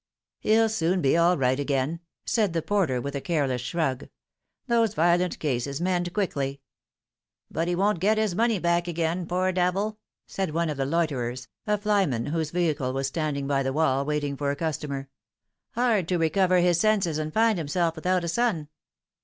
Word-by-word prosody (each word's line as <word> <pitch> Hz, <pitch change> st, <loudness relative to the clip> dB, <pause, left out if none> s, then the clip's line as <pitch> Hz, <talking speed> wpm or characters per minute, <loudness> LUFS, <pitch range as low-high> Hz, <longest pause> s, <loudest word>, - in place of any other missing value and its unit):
"He'll 225 Hz, +1 st, +3 dB
soon 185 Hz, -4 st, 0 dB
be 135 Hz, -3 st, +2 dB
all 170 Hz, +2 st, +4 dB
right 130 Hz, 0 st, +1 dB
again," 140 Hz, +3 st, -1 dB, 0.3 s
said 210 Hz, -7 st, +1 dB
the 165 Hz, -2 st, -1 dB
porter 180 Hz, -12 st, +1 dB
with 140 Hz, +3 st, -4 dB
a 140 Hz, -, -2 dB
careless 140 Hz, -7 st, 0 dB
shrug; 135 Hz, -1 st, -2 dB, 0.3 s
" -, -, -55 dB
those 230 Hz, -3 st, +2 dB
violent 175 Hz, +2 st, +2 dB
cases 140 Hz, -1 st, -2 dB
mend 175 Hz, 0 st, 0 dB
quickly." 140 Hz, -9 st, -2 dB, 0.4 s
" -, -, -48 dB
But 165 Hz, +1 st, -1 dB
he 175 Hz, -, 0 dB
won't 195 Hz, 0 st, +1 dB
get 210 Hz, +5 st, +2 dB
his 215 Hz, -4 st, +1 dB
money 225 Hz, +3 st, +2 dB
back 170 Hz, 0 st, +1 dB
again, 170 Hz, +1 st, -1 dB
poor 185 Hz, +1 st, +1 dB
devil," 190 Hz, +4 st, 0 dB, 0.3 s
said 190 Hz, -5 st, -3 dB
one 170 Hz, -1 st, +1 dB
of 145 Hz, -, -5 dB
the 135 Hz, -1 st, -1 dB
loiterers, 130 Hz, -7 st, -1 dB, 0.2 s
a 210 Hz, 0 st, +2 dB
flyman 200 Hz, -, +1 dB
whose 160 Hz, -2 st, -1 dB
vehicle 155 Hz, -6 st, 0 dB
was 135 Hz, +1 st, -1 dB
standing 140 Hz, 0 st, -2 dB
by 140 Hz, -1 st, +1 dB
the 135 Hz, 0 st, -1 dB
wall, 140 Hz, -3 st, +2 dB
waiting 145 Hz, -1 st, -2 dB
for 140 Hz, 0 st, -2 dB
a 140 Hz, -, 0 dB
customer. 140 Hz, -3 st, -3 dB, 0.3 s
" -, -, -59 dB
Hard 225 Hz, -7 st, +2 dB
to 180 Hz, -, +1 dB
recover 180 Hz, +2 st, +3 dB
his 175 Hz, -1 st, +3 dB
senses 195 Hz, -7 st, +2 dB
and 155 Hz, 0 st, -3 dB
find 220 Hz, 0 st, +2 dB
himself 165 Hz, +2 st, 0 dB
without 180 Hz, +2 st, 0 dB
a -, -, -2 dB
sou." 175 Hz, -4 st, 0 dB
170 Hz, 185 wpm, -26 LUFS, 140-185 Hz, 0.4 s, all